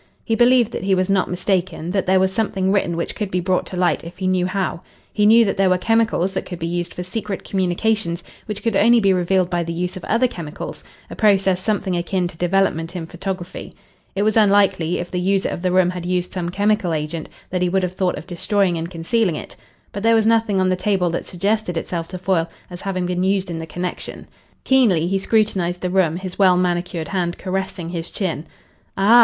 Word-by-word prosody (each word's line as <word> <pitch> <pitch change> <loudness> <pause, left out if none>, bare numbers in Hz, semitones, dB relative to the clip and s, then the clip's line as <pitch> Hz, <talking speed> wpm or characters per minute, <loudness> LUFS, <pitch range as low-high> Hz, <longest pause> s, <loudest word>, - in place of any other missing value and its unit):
He 225 - 0
believed 240 0 +4
that - - -5
he 195 0 +3
was 185 +1 0
not 195 -2 +2
mistaken, 180 -2 -1
that 195 -1 -1
there 190 0 +4
was 190 0 +1
something 195 -4 0
written 190 -4 +1
which 170 - -2
could 210 -4 -3
be 180 - 0
brought 185 +1 0
to 185 - -6
light 180 -1 +1
if 170 +2 -10
he 190 - -4
knew 185 -1 +2
how. 185 -3 -2 0.3
He 210 -1 +3
knew 230 +1 +7
that 195 - -1
there 195 -1 +3
were 185 - +3
chemicals 225 -2 +1
that - - -2
could 180 - -7
be 165 - -4
used 175 +1 -2
for 180 - -5
secret 205 +1 -4
communications 185 -1 0 0.2
which 210 -2 -5
could 230 -3 0
only 235 +4 +5
be 195 -3 +3
revealed 185 0 +1
by 175 -1 +1
the 170 0 -3
use 180 +1 -3
of 185 - -8
other 235 +3 +2
chemicals 165 -9 -7 0.3
a - - -6
process 195 -4 +3
something 200 -3 -1
akin 175 +1 -1
to - - -12
development 175 -1 0
in 170 -2 -4
photography. 180 +1 -6 0.4
It 200 - +1
was 215 0 +2
unlikely, 195 -5 +3
if 175 - -5
the 180 - -1
user 195 +1 +1
of - - -5
the 185 0 0
room 180 -1 +3
had 180 -1 -6
used 180 0 -1
some 175 -2 -2
chemical 200 -3 +1
agent, 155 +1 -4 0.2
that 180 -1 -1
he 180 - +2
would 190 +1 +1
have 180 0 -2
thought 185 -1 0
of - - -8
destroying 180 0 0
and 165 +1 -4
concealing 180 +2 0
it. - - -7 0.4
But 200 - -5
there 230 +1 +4
was 220 -1 +3
nothing 225 -3 +3
on 185 0 +2
the 185 - +2
table 185 -2 +1
that 170 - -3
suggested 195 0 -1
itself 165 0 -3
to 185 - -6
Foyle 180 -2 0 0.2
as 175 - -8
having 185 -2 -2
been 180 0 -1
used 190 -1 0
in 165 - -4
the 160 - -6
connection. 180 +2 -5 0.4
Keenly 225 -12 +4
he 195 +2 0
scrutinised 190 -5 +1
the 180 - -2
room, 175 -4 +2
his 185 0 -7
well 185 -2 +5
manicured 175 -2 -1
hand 175 -3 -1
caressing 190 -2 -3
his 170 -1 -5
chin. 165 -5 -3 0.5
"Ah!" 210 +5 +6
185 Hz, 225 wpm, -21 LUFS, 175-200 Hz, 0.5 s, knew